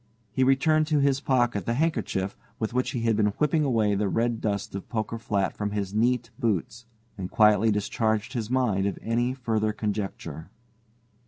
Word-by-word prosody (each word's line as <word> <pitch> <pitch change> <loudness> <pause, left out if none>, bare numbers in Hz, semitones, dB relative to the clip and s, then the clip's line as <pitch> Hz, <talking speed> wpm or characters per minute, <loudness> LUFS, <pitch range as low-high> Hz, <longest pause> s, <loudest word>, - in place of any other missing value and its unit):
He 130 +5 +1
returned 155 +4 +3
to 155 -1 +2
his 140 -1 +2
pocket 120 - +1
the 115 - +1
handkerchief 115 - -1 0.2
with 110 0 -3
which 125 0 0
he 120 - -3
had 115 -1 +2
been 105 -1 +2
whipping 150 +1 +2
away 110 -7 +2
the 100 +1 0
red 115 +2 0
dust 100 -2 -2
of 100 -1 -6
Poker 115 0 -3
Flat 100 -4 -1
from 105 -1 -3
his 100 -2 -2
neat 120 +1 +1
boots, 115 +2 -2 0.3
and 90 -1 -4
quietly 105 0 +4
discharged 110 +3 0
his 115 -4 -3
mind 115 -7 +1
of 100 - -3
any 120 +3 0
further 110 -4 0
conjecture. 100 -7 -4
115 Hz, 175 wpm, -26 LUFS, 105-125 Hz, 0.3 s, quietly